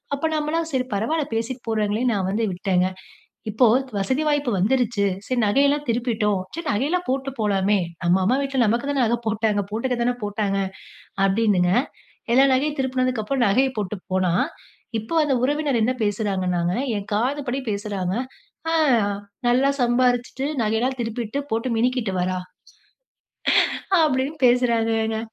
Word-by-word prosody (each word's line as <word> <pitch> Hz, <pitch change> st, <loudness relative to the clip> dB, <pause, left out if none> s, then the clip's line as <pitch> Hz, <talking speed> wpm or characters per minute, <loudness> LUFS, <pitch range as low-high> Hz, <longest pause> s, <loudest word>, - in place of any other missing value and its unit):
அப்போ 280 Hz, +3 st, -1 dB
நம்மலாம் 315 Hz, +2 st, -1 dB
சரி 255 Hz, -1 st, +1 dB
பரவால்ல, 290 Hz, +10 st, 0 dB
பேசிட்டு 235 Hz, +2 st, -3 dB
போறாங்களேன்னு 220 Hz, +3 st, +1 dB
நான் 190 Hz, -2 st, -1 dB
வந்து 225 Hz, +3 st, 0 dB
விட்டேங்க. 185 Hz, 0 st, +1 dB, 0.6 s
இப்போ 230 Hz, +4 st, +4 dB, 0.3 s
வசதி 260 Hz, +10 st, 0 dB
வாய்ப்பு 290 Hz, -4 st, +1 dB
வந்துருச்சு. 225 Hz, +1 st, +1 dB, 0.2 s
"சரி 255 Hz, -, -2 dB
நகையெல்லாம் 280 Hz, +7 st, +2 dB
திருப்பிட்டோம். 225 Hz, -4 st, 0 dB
சரி 335 Hz, -, -6 dB
நகையெல்லாம் 310 Hz, +11 st, 0 dB
போட்டு 270 Hz, +1 st, -1 dB
போலாமே. 205 Hz, -1 st, +2 dB, 0.3 s
நம்ம 175 Hz, +2 st, +4 dB
அம்மா 225 Hz, +7 st, +3 dB
வீட்ல 275 Hz, -1 st, -2 dB
நமக்கு 235 Hz, +6 st, 0 dB
தானே 280 Hz, -2 st, +1 dB
நகை 235 Hz, +2 st, +1 dB
போட்டாங்க. 215 Hz, -1 st, +1 dB
போட்டுக்க 245 Hz, +4 st, -1 dB
தானே 245 Hz, +1 st, +2 dB
போட்டாங்க" 205 Hz, -1 st, -1 dB, 0.7 s
அப்டீன்னுங்க 195 Hz, -3 st, +2 dB, 0.6 s
எல்லா 265 Hz, +3 st, +6 dB
நகையும் 290 Hz, +3 st, 0 dB
திருப்புனதுக்கப்பறம், 255 Hz, -1 st, 0 dB
நகைய 260 Hz, +7 st, +3 dB
போட்டு 210 Hz, -1 st, -2 dB, 0.2 s
போனா, 185 Hz, -2 st, +2 dB, 0.7 s
"இப்போ 220 Hz, +8 st, -7 dB
அந்த 285 Hz, -3 st, +1 dB
உறவினர் 290 Hz, -2 st, +1 dB
என்ன 255 Hz, +3 st, +2 dB
பேசுறாங்கன்னாங்க, 185 Hz, -5 st, 0 dB, 0.2 s
என் 200 Hz, 0 st, -6 dB
காதுபடி 260 Hz, +4 st, -1 dB
பேசுறாங்க, 200 Hz, -3 st, -2 dB, 0.6 s
"அ -, -, +1 dB, 0.7 s
நல்லா 255 Hz, +3 st, +3 dB
சம்பாரிச்சுட்டு, 245 Hz, +2 st, +1 dB, 0.2 s
நகையெல்லாம் 225 Hz, +5 st, 0 dB
திருப்பிட்டு, 230 Hz, +2 st, -3 dB
போட்டு 230 Hz, +3 st, -1 dB
மினிக்கிட்டு 240 Hz, -3 st, 0 dB
வரா" 185 Hz, 0 st, -1 dB, 1.7 s
அப்டீன்னு 285 Hz, +1 st, 0 dB
பேசுறாங்கங்க. 225 Hz, -2 st, +2 dB
235 Hz, 130 wpm, -23 LUFS, 205-265 Hz, 1.7 s, எல்லா